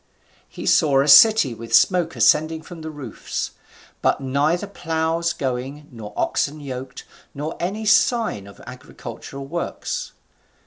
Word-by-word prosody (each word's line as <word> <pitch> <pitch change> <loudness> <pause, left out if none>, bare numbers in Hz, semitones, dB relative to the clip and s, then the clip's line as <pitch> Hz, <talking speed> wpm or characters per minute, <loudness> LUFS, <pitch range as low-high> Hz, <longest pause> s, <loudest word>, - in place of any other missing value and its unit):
He - - -8
saw 140 -3 +4
a - - -3
city 215 - +7
with 115 0 -1
smoke 175 -5 +3
ascending 155 +8 +3
from 175 -2 -10
the 160 - -6
roofs, 145 -7 -5 0.5
but - - +2
neither 145 +7 0
ploughs 165 -3 -1
going, 135 +2 -4
nor 110 -4 -9
oxen 150 +2 -1
yoked, 130 -2 -7 0.3
nor 150 +3 -4
any 200 +6 -3
sign 220 - +2
of 100 - -14
agricultural 130 +2 -9
works. 175 - -4
150 Hz, 130 wpm, -22 LUFS, 130-170 Hz, 0.5 s, city